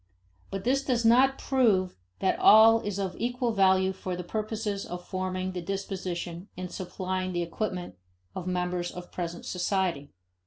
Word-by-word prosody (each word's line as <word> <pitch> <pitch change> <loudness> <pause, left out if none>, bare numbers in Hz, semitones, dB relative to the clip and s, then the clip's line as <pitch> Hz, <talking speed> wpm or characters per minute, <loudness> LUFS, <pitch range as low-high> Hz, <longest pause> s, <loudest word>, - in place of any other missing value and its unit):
But 195 -1 -4
this 270 +3 +2
does 245 -4 0
not 260 +4 +5
prove 215 -9 +2 0.3
that 190 - +1
all 225 +1 +8
is 205 -3 -4
of 190 -2 -2
equal 245 +1 0
value 190 -2 +3
for 185 -1 -4
the 180 - -5
purposes 215 +1 -3
of 175 0 -7
forming 185 0 -2
the 180 -1 -4
disposition 185 -1 -4
and 180 -1 -5
supplying 185 +1 -3
the 175 0 0
equipment 175 - -4 0.4
of 185 - -6
members 180 -1 -1
of 180 0 -9
present 170 -1 -5
society. 180 -6 -1
185 Hz, 155 wpm, -28 LUFS, 180-215 Hz, 0.4 s, all